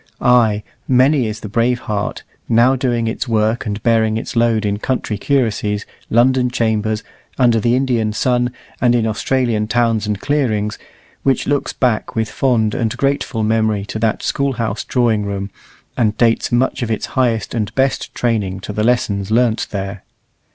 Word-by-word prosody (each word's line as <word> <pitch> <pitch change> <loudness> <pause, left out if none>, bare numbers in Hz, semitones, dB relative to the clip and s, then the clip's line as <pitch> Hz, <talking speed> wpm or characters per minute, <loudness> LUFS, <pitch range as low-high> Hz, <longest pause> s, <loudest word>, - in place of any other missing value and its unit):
Ay, 115 -4 +3 0.2
many 130 0 +3
is 110 0 -5
the - - -6
brave 115 +4 +1
heart, 105 -2 -3 0.3
now 120 +3 +4
doing 120 -3 0
its 115 - -3
work 110 0 0
and 105 0 -4
bearing 110 -2 +2
its 115 - -5
load 115 -2 +2
in 100 0 -1
country 125 -3 -2
curacies, 105 -4 0 0.2
London 125 +2 +3
chambers, 110 -3 0 0.3
under 120 -3 +4
the 120 +3 +2
Indian 125 -5 +1
sun, 125 +3 +1 0.3
and 120 -1 +4
in 115 -2 +1
Australian 115 0 0
towns 115 -2 +1
and 105 -2 -2
clearings, 110 -8 -1 0.4
which 135 -2 +1
looks 145 -1 0
back 120 -4 -1
with 110 -1 -1
fond 115 -5 +1
and 115 -3 -1
grateful 135 -4 0
memory 110 -2 +1
to 110 - -5
that 110 -1 0
School 140 -1 0
house 115 -3 -2
drawing 115 -4 +1
room, 100 -1 -4 0.4
and 110 -4 +1
dates 115 -1 +2
much 125 +2 +1
of 120 - -2
its 110 - -1
highest 115 -5 0
and 110 -3 -2
best 135 0 0
training 105 -6 -1
to 105 - -6
the 105 - -1
lessons 105 -5 +1
learnt 115 0 +2
there. 100 -1 -5
115 Hz, 165 wpm, -18 LUFS, 105-125 Hz, 0.4 s, now